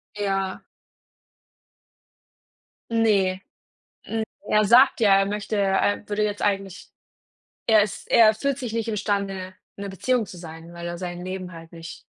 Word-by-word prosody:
Ja. 195 Hz, -2 st, -2 dB, 2.3 s
Ne. 200 Hz, -5 st, +2 dB, 1.0 s
Hm, -, -, -6 dB
er 215 Hz, 0 st, +5 dB
sagt 250 Hz, +5 st, +6 dB
ja, 200 Hz, -3 st, +6 dB
er 195 Hz, -, +2 dB
möchte 210 Hz, +1 st, -3 dB
er 200 Hz, +1 st, +1 dB
würde 210 Hz, 0 st, -1 dB
jetzt 205 Hz, -1 st, -2 dB
eigentlich 195 Hz, -1 st, -2 dB, 0.8 s
er 220 Hz, -2 st, +6 dB
ist 210 Hz, -, -5 dB
er 220 Hz, -1 st, +6 dB
fühlt 280 Hz, +4 st, -1 dB
sich 245 Hz, -5 st, -5 dB
nicht 230 Hz, 0 st, -2 dB
imstande, 200 Hz, -3 st, -2 dB, 0.2 s
in 200 Hz, -, -6 dB
'ner -, -, -5 dB
Beziehung 230 Hz, +4 st, 0 dB
zu 180 Hz, -, -11 dB
sein, 165 Hz, 0 st, -10 dB
weil 170 Hz, 0 st, -7 dB
er 175 Hz, 0 st, -5 dB
sein 175 Hz, 0 st, -6 dB
Leben 185 Hz, -1 st, -5 dB
halt 165 Hz, -1 st, -12 dB
nicht 165 Hz, 0 st, -10 dB
200 Hz, 150 wpm, -24 LUFS, 185-215 Hz, 2.3 s, sagt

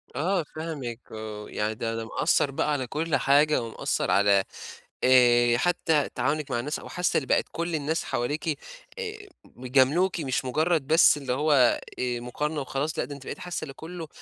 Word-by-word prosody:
آه 175 Hz, +3 st, 0 dB
فاهمِك، 145 Hz, -8 st, -5 dB, 0.5 s
يعني 105 Hz, +1 st, -2 dB
ده 115 Hz, +1 st, -3 dB
ده 115 Hz, 0 st, -4 dB
مأثّر 140 Hz, +4 st, +1 dB
بقى 145 Hz, +2 st, 0 dB
على 130 Hz, -3 st, -2 dB
كلّ 155 Hz, +3 st, -1 dB
حاجة، 145 Hz, +1 st, +3 dB
ومأثّر 115 Hz, -1 st, -2 dB
على 100 Hz, -1 st, +4 dB, 0.6 s
آآ 120 Hz, -2 st, +5 dB
حتّى 160 Hz, -2 st, +1 dB
تعاونِك 150 Hz, 0 st, -1 dB
مع 120 Hz, -, 0 dB
الناس 150 Hz, +5 st, -3 dB
أو -, -, -10 dB
حاسّة 180 Hz, 0 st, 0 dB
اللي 135 Hz, -, 0 dB
بقِت -, -, +2 dB
كلّ 170 Hz, 0 st, -3 dB
الناس 155 Hz, +2 st, -1 dB
حواليكِ، 145 Hz, +7 st, -2 dB, 0.5 s
آآ 430 Hz, -3 st, -6 dB, 0.2 s
بيجاملوكِ 140 Hz, +9 st, +1 dB
مش 135 Hz, -3 st, -1 dB
مُجرّد 155 Hz, +2 st, +1 dB
بس 160 Hz, 0 st, +6 dB
اللي 135 Hz, -3 st, -3 dB
هو 150 Hz, +4 st, +1 dB, 0.5 s
آآ 125 Hz, -1 st, -1 dB
مقارنة 150 Hz, +5 st, -3 dB
وخلاص، 140 Hz, +3 st, -3 dB
لأ -, -, +1 dB
ده 145 Hz, -, -7 dB
أنتِ 140 Hz, -2 st, -12 dB
بقيتِ -, -, -5 dB
حاسّة 180 Hz, -2 st, -4 dB
اللي 135 Hz, -3 st, -9 dB
كلّه 165 Hz, +1 st, -8 dB
145 Hz, 175 wpm, -26 LUFS, 125-160 Hz, 0.6 s, بس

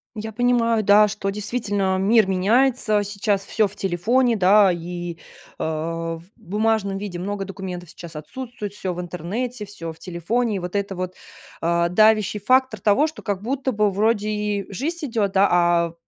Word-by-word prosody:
Я 220 Hz, +1 st, -5 dB
понимаю, 230 Hz, -1 st, +2 dB
да, 210 Hz, +1 st, +6 dB
что 195 Hz, -1 st, -3 dB
действительно 205 Hz, -2 st, -1 dB
мир 210 Hz, +2 st, +4 dB
меняется, 215 Hz, +2 st, +2 dB
сейчас 200 Hz, 0 st, -1 dB
всё 215 Hz, -2 st, +1 dB
в 200 Hz, -, -11 dB
телефоне, 230 Hz, +7 st, +1 dB
да, 195 Hz, 0 st, +5 dB
и, 175 Hz, 0 st, -6 dB, 0.4 s
э, -, -, -2 dB
в 165 Hz, +1 st, -3 dB
бумажном 215 Hz, -1 st, -1 dB
виде 195 Hz, -3 st, -5 dB
много 195 Hz, +1 st, -3 dB
документов 185 Hz, -3 st, -7 dB
сейчас 170 Hz, -1 st, -11 dB
отсутствует, 210 Hz, -, -7 dB
всё 190 Hz, -3 st, -4 dB
в 180 Hz, -, -5 dB
интернете, 210 Hz, +7 st, -4 dB
всё 170 Hz, -5 st, -7 dB
в 160 Hz, -, -21 dB
телефоне. 205 Hz, +6 st, -1 dB
И 190 Hz, -, -2 dB
вот 180 Hz, +2 st, -6 dB
это 200 Hz, -1 st, -1 dB
вот, 185 Hz, 0 st, -4 dB, 0.5 s
э, 170 Hz, +1 st, +1 dB
давящий 215 Hz, +2 st, +3 dB
фактор 255 Hz, 0 st, +2 dB
того, 210 Hz, +9 st, +3 dB
что 315 Hz, -, -9 dB
как 200 Hz, -3 st, -3 dB
будто 265 Hz, +2 st, -1 dB
бы 210 Hz, -3 st, +1 dB
вроде 210 Hz, +1 st, +1 dB
и 210 Hz, -2 st, -2 dB
жизнь 320 Hz, -, -3 dB
идёт, 220 Hz, -8 st, -1 dB
а, 175 Hz, -3 st, +3 dB
200 Hz, 165 wpm, -22 LUFS, 180-220 Hz, 0.5 s, да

